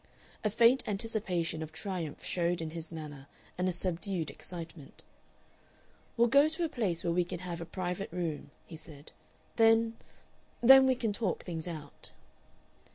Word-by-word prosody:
A 210 - +2
faint 235 +5 +5
anticipation 195 -6 -2
of 160 0 -5
triumph 170 -3 -5
showed 175 -1 0
in 160 -1 -4
his 165 0 -6
manner 150 -4 -8 0.3
and 180 +1 0
a - - +1
subdued 175 -2 -2
excitement. 165 -2 -8 1.1
"We'll 235 +1 +5
go 280 +5 +6
to 320 +3 -2
a 330 - 0
place 195 - -1
where 170 -1 +1
we 180 +1 +3
can 175 - -5
have 175 -2 -5
a - - -4
private 180 +2 -4
room," 165 -5 -3 0.2
he 165 - -10
said. 155 -2 -11 0.5
"Then 225 0 +4 0.6
then 265 +2 +9
we 260 - +4
can 225 -4 -1
talk 200 -4 -2
things 165 -1 -5
out." 155 -4 -8
180 Hz, 160 wpm, -31 LUFS, 165-225 Hz, 1.1 s, then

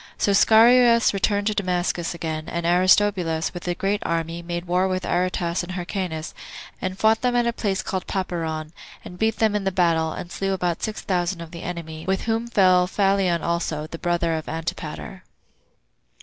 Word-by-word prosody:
So 205 - +1
Scaurus 230 +2 +6
returned 200 +1 0
to 215 - +1
Damascus 180 -3 -1
again; 160 -2 -4
and 170 0 -3
Aristobulus, 180 -2 +2
with 175 0 -7
a 175 - 0
great 200 +3 -1
army, 165 0 -2
made 175 0 -4
war 180 +2 +1
with 185 -1 -2
Aretas 175 -1 0
and 180 +1 -6
Hyrcanus, 180 -3 -4 0.5
and 185 0 -3
fought 220 +1 +3
them 250 -1 +1
at 240 -1 +3
a 235 - 0
place 195 -5 -2
called 190 -2 -4
Papyron, 160 -5 -3 0.3
and 180 - -10
beat 220 0 +1
them 220 -2 +2
in 205 - -1
the 195 - 0
battle, 165 -3 +2
and 175 - -7
slew 195 0 -1
about 180 -3 -1
six 215 0 -3
thousand 175 -1 -1
of 165 -1 -9
the 170 -1 -8
enemy, 160 -2 -6
with 190 0 0
whom 225 +1 -1
fell 185 -5 +4
Phalion 195 -3 +1
also, 170 -3 -1
the 165 +1 -8
brother 175 -1 0
of 160 -1 -4
Antipater. 160 +1 -5
180 Hz, 180 wpm, -23 LUFS, 170-200 Hz, 0.5 s, Scaurus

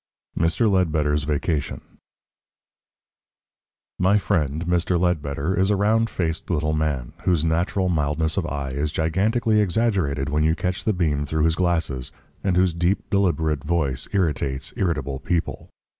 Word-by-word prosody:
9. 80 - +2
MR. 110 +5 +1
LEDBETTER'S 75 -5 +1
VACATION 75 0 -1 2.2
My 95 +3 +4
friend, 80 -6 0
Mr. 90 0 +1
Ledbetter, 80 -2 0
is 95 +1 +2
a 105 - +3
round 110 +3 +2
faced 80 -2 -3
little 75 -3 0
man, 75 -6 -2
whose 85 -4 +2
natural 85 +4 0
mildness 80 -1 0
of 90 -4 -1
eye 70 -3 -4
is 75 +3 -2
gigantically 105 +8 +1
exaggerated 95 - 0
when 75 +1 +1
you 80 +1 +3
catch 90 +2 -3
the 110 - +3
beam 75 -6 0
through 80 +1 0
his 80 0 +3
glasses, 80 -7 -1 0.3
and 95 -2 +1
whose 90 -2 +3
deep, 90 +5 -1
deliberate 80 -7 +1
voice 75 -5 -1
irritates 75 -8 -1
irritable 70 -7 -1
people. 85 +4 -2
80 Hz, 145 wpm, -23 LUFS, 75-95 Hz, 2.2 s, My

